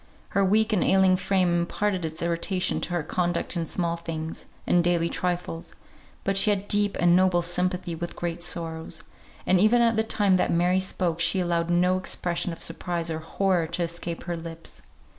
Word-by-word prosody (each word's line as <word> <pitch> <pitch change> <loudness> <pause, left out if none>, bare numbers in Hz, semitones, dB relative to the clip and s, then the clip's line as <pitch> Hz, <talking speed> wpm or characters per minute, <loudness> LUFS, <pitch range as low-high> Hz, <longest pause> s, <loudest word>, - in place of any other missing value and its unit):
Her 200 - +1
weak 215 +3 +2
and 195 - +2
ailing 190 -1 +4
frame 185 -2 +1
imparted 185 +1 -1
its 160 +1 -4
irritation 170 +2 0
to - - -1
her 175 -3 0
conduct 175 +2 -1
in 165 -1 -2
small 170 0 -2
things, 160 -1 -6 0.2
and 175 -1 +3
daily 170 -1 +1
trifles; 175 -2 -3 0.5
but 195 - 0
she 195 +2 +4
had 205 -1 0
deep 205 -1 +1
and 175 0 +5
noble 185 -1 +3
sympathy 180 0 -1
with 170 +1 -5
great 170 -1 -4
sorrows, 165 -1 -3 0.4
and 185 - +3
even 215 +5 +4
at 230 -1 +2
the 220 - +3
time 205 -4 +2
that - - +1
Mary 180 +2 +2
spoke 180 -3 -1
she 170 +3 +3
allowed 170 -1 0
no 180 +1 +3
expression 175 -1 -1
of 165 - -4
surprise 170 0 -2
or 160 - -3
horror 175 +1 0
to 170 +2 -2
escape 170 0 -4
her 175 -1 -3
lips. 165 0 -9
175 Hz, 185 wpm, -26 LUFS, 170-190 Hz, 0.5 s, and